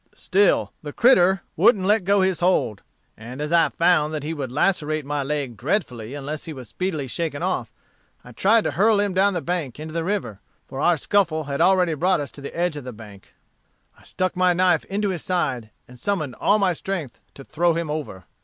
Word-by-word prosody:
Still 200 +1 +2
the 150 - -7
critter 190 -6 +4
wouldn't 205 -6 +4
let 205 -1 +2
go 200 0 +3
his 190 -2 +1
hold; 175 - +1 0.3
and 120 +5 -10
as 150 +1 -3
I 170 -1 +4
found 155 -3 +2
that 150 - -4
he 155 +2 -3
would 135 -5 -5
lacerate 155 -1 0
my 145 0 -2
leg 140 -3 -3
dreadfully 125 - -2
unless 145 +2 -5
he 160 - -6
was 130 -6 -10
speedily 175 - -3
shaken 145 +2 -3
off, - - -2 0.5
I 125 - -13
tried 210 - +3
to - - -1
hurl 210 +3 +3
him 205 -2 0
down 195 +1 +2
the 175 - -2
bank 165 -8 -3
into 155 0 -7
the 165 0 -1
river, 180 - -3 0.3
for 135 - -7
our 170 +3 +3
scuffle 170 -1 +1
had 140 +1 -3
already 180 -1 +4
brought 180 +4 +1
us 145 - -5
to 140 - -12
the 140 - -8
edge 175 -3 0
of 145 - -7
the 125 - -7
bank. 105 -3 -14 0.6
I - - -22
stuck 185 -1 -2
my 180 0 +3
knife 180 0 +2
into 205 +1 -1
his 180 -4 -4
side, 130 -11 -1 0.2
and 125 0 -15
summoned 155 -6 -2
all 210 - +3
my 195 -3 +2
strength 170 -6 -5 0.2
to 135 - -10
throw 165 +3 +1
him 165 -2 -2
over. 145 -12 -5
165 Hz, 210 wpm, -23 LUFS, 140-185 Hz, 0.6 s, critter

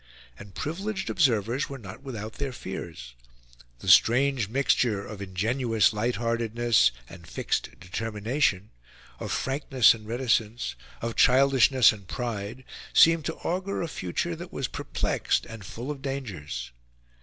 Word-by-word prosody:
And 100 -2 -12
privileged 190 +5 -3
observers 120 - +1
were 140 - -6
not 110 +1 -10
without 110 -5 -6
their 140 -2 -3
fears. 85 - -7 0.7
The - - -9
strange 125 -2 +5
mixture 120 -5 +1
of 105 -1 -8
ingenuous 110 +4 +1
light 115 +4 0
heartedness 115 - +2 0.2
and - - -13
fixed - - -3
determination, 105 +2 -1 0.5
of - - -5
frankness 135 -3 +3
and 110 -2 -11
reticence, 115 - 0 0.3
of 115 -1 -2
childishness 130 -1 +5
and 100 -3 -11
pride, 115 +1 -4 0.3
seemed 165 -1 +6
to 165 - -2
augur 185 +2 -1
a - - -2
future 145 - -3
that 175 +2 -9
was 135 - -2
perplexed - - -1
and 110 -3 -9
full 120 +8 -6
of 140 -2 -7
dangers. 95 - -5
120 Hz, 130 wpm, -27 LUFS, 105-135 Hz, 0.7 s, seemed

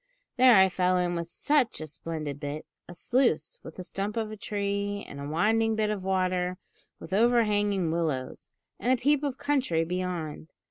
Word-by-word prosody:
There 250 -1 +7
I 190 -1 +7
fell 185 0 +1
in 175 -1 0
with 170 -1 -3
such 275 - +1
a 155 - -5
splendid 155 -2 -5
`bit;' 145 +2 -4 0.3
a 175 - -9
sluice, 205 - +1
with 160 - -11
a 185 - -5
stump 200 +4 -4
of 220 -1 -2
a - - -5
tree, 200 -1 -2
and 140 - -9
a 140 - -5
winding 220 +8 +2
bit 215 -1 +1
of 200 -3 -3
water 185 -1 0 0.4
with 175 - -8
overhanging 205 -5 +2
willows, 155 -6 -2 0.3
and 250 - +1
a 260 - +3
peep 285 +3 +3
of 280 -3 -2
country 270 - +1
beyond! 175 -3 -4
190 Hz, 180 wpm, -28 LUFS, 165-225 Hz, 0.4 s, There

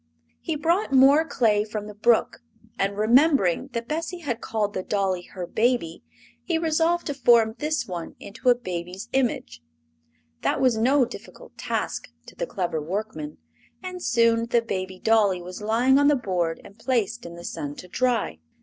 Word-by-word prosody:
He 320 - -3
brought 335 +5 +1
more 275 +3 +6
clay 220 -9 +2
from 215 -1 -5
the 210 - -8
brook, 225 +2 +2 0.4
and 200 +1 0
remembering 245 - +3
that 235 0 -3
Bessie 330 +4 -4
had 245 -7 -3
called 210 -2 -2
the 185 - -2
dolly 190 -2 -1
her 180 0 -7
baby 220 -5 0 0.4
he 335 - 0
resolved 330 +1 +1
to 290 - -2
form 235 -4 +4
this 310 +1 -1
one 175 -3 -6
into 230 +5 -2
a 245 - +6
baby's 185 -2 -6
image. 225 - -1 0.8
That - - 0
was 255 -3 +3
no 255 +4 +3
difficult - - -12
task - - -3 0.2
to - - -13
the - - -4
clever 175 - -2
workman, 170 -2 -5 0.5
and 365 -1 -6
soon 230 -3 +2
the 235 0 +2
baby 185 -4 -4
dolly 205 -3 +3
was 180 +3 -8
lying 240 +6 +3
on 285 - +4
the 295 - +5
board 180 -9 -1
and 200 +2 -15
placed 235 -2 -1
in 170 - -9
the 170 0 -10
sun 145 0 -5
to 180 - -10
dry. 230 - 0
225 Hz, 170 wpm, -25 LUFS, 190-265 Hz, 0.8 s, more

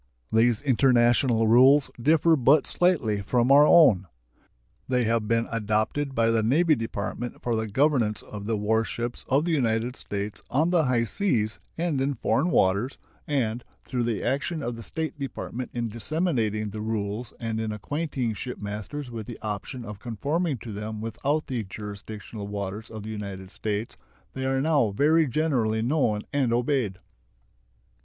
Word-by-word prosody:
These 115 +2 +3
international 120 -3 +3
rules 130 +5 +6
differ 160 +4 +4
but 140 +2 +4
slightly 140 - +1
from 120 +5 +1
our 145 +2 +8
own. 110 - +6 0.8
They 125 -1 +1
have 115 -1 0
been 115 +1 +1
adopted 115 +6 -1
by 115 -1 +3
the 115 -1 +2
Navy 155 +9 +3
Department 115 -1 -4
for 120 -2 0
the 110 0 -1
governance 120 -2 +1
of 105 -1 -8
the 115 -1 0
war 110 +2 +1
ships 120 +1 -4
of 140 +4 +3
the 175 - 0
United 120 -4 0
States 100 -2 -5
on 155 +6 +2
the 170 -4 +3
high 125 -2 +2
seas 115 - 0 0.2
and 165 -5 0
in 140 +1 0
foreign 145 +7 +1
waters, 100 - +2 0.3
and, 120 -5 -1 0.2
through 125 - -2
the 115 -3 -1
action 140 +3 -1
of 120 -2 -3
the 115 - -8
State 155 +4 -4
Department 130 -2 -5
in 120 -1 -2
disseminating 110 - -1
the 105 +1 -5
rules 110 +1 -3
and 115 -2 -3
in 110 -1 -2
acquainting 130 - -2
shipmasters 110 +5 -6
with 110 -3 -6
the 120 - -7
option 110 +4 -5
of 105 -1 -8
conforming 140 - -2
to 115 0 -8
them 105 +1 -5
without 135 +8 -1
the 125 -4 -3
jurisdictional 105 +1 -8
waters 100 +1 -5
of 110 -2 -8
the 110 - -6
United 100 -3 -6
States, 110 +2 -3 0.4
they 130 0 -4
are 135 0 +1
now 145 -6 +3
very 150 +9 +3
generally 120 -6 0
known 120 -6 +1
and 135 -4 +1
obeyed. 120 -5 0
115 Hz, 160 wpm, -26 LUFS, 110-140 Hz, 0.8 s, our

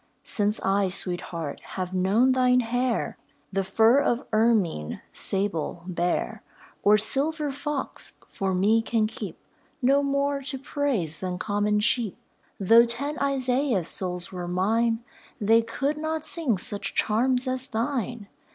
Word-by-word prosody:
Since 210 +1 0
I, 195 0 +2
Sweet 180 -1 -2
Heart, 165 -4 -5 0.2
have 185 0 -3
known 200 +8 +3
thine 250 -1 +4
hair, 245 +1 -1 0.3
The 195 0 +1
fur 220 +7 +4
of 245 -2 0
ermine, 215 - +1
sable, 190 -4 -2
bear, 175 -1 -1 0.4
Or 210 +1 +5
silver 290 +6 +3
fox, 285 0 -4
for 195 -3 -2
me 210 +5 +3
can 225 -1 +1
keep 225 +5 -6 0.4
No 275 +1 +3
more 280 0 0
to 270 0 -4
praise 260 - -2
than 180 -1 -3
common 210 +1 0
sheep. 225 -2 0 0.4
Though 225 +4 +6
ten 280 +6 -2
Isaiahs' 260 - +1
souls 180 -2 -3
were 180 -2 -5
mine, 225 +6 +1 0.4
They 225 +2 +4
could 275 +6 -2
not 315 0 -3
sing 290 - -1
such 200 +2 -3
charms 250 +4 +2
as 255 +1 -1
thine. 235 -2 -2
225 Hz, 135 wpm, -26 LUFS, 195-260 Hz, 0.4 s, Though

